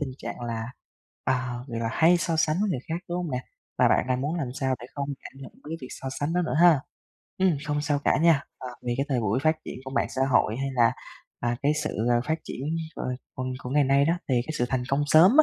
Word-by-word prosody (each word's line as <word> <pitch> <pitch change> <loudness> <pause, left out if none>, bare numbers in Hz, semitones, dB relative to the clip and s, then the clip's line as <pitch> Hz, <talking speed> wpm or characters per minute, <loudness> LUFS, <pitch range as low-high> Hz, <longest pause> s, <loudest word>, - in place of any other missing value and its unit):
tình 140 -3 -2
trạng - - -6
là 115 -2 -3 0.6
à, 125 -1 0
vậy 115 -1 -3
là 115 - 0
hay 170 +2 +5
so 170 -1 0
sánh 155 0 +2
với 210 -2 +1
người 130 - 0
khác, 160 - -1
đúng 175 - -2
hông 175 -3 -3
nè? 125 - -1 0.4
Và - - +6
bạn - - +3
đang 125 0 +1
muốn 150 +5 -1
làm 145 -7 -2
sao 130 -2 0
để 120 - -8
không 140 -1 -3
cảm - - -9
nhận - - -10
đến - - -25
cái 165 - -2
việc 130 - -7
so 135 - -6
sánh 145 +3 0
đó 180 0 +2
nữa 160 - -2
ha! 170 -5 +7 0.6
Ừm, 185 -5 +3
không 145 0 0
sao 145 -1 +1
cả - - +3
nha. 160 -3 +4 0.2
À, 130 - -6 0.2
vì 120 - +1
cái 140 +1 0
thời 130 -4 +1
buổi 110 +3 +1
phát 155 0 +3
triển - - -6
của 130 - -6
mạng 135 - +1
xã 130 - -1
hội, 115 -2 +3
hay 135 +1 -2
là, 120 -1 +4 0.5
à, 120 0 0
cái 145 - +4
sự, - - -1 0.2
ờ, 120 0 +4
phát 160 +1 0
triển - - -6 0.4
cờ - - -4 0.3
còn 130 0 -3 0.2
của 125 - -5
ngày 145 0 +4
nay 140 +1 +4
đó, 165 - +3 0.2
thì 130 - +2
cái 155 - -3
sự 120 - +2
thành 130 -2 0
công 140 +2 +2
sớm 160 +5 +7
140 Hz, 270 wpm, -26 LUFS, 125-155 Hz, 0.6 s, ha